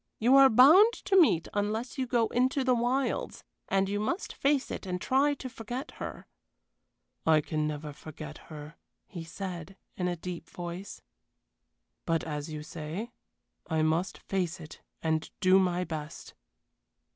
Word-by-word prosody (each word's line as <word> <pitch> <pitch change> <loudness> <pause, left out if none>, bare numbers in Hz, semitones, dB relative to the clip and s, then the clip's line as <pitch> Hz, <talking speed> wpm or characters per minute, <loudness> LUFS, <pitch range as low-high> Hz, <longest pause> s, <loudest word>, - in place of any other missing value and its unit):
You 245 +4 +4
are 275 -1 +9
bound 315 - +7
to 390 - -1
meet 305 - +5
unless 220 +6 -2
you 260 - 0
go 235 -2 +2
into 260 +2 +1
the 255 -1 +3
wilds. 245 +3 -1 0.2
And 195 0 +2
you 205 +1 -1
must 340 - -2
face 280 -1 +1
it - - -5
and 180 0 -2
try 280 +7 +2
to 265 - -7
forget 245 +4 -6
her." - - -6 1.0
"I 160 -1 +5
can 155 0 -1
never 150 0 -5
forget 155 0 -9
her," 150 +2 -9 0.3
he 175 -5 -8
said, 180 +2 -7 0.2
in 180 - -1
a 175 - -1
deep 170 -1 -7
voice; 175 +2 -7 1.0
"but, 165 -1 +1
as 150 -1 -4
you 150 -1 -6
say, 165 +9 -6 0.6
I 160 -2 +1
must 160 +4 0
face 185 -2 -2
it 155 -2 -11 0.2
and 160 -1 0
do 185 -1 +5
my 180 -1 +1
best." 155 -3 -7
185 Hz, 155 wpm, -29 LUFS, 160-245 Hz, 1.0 s, are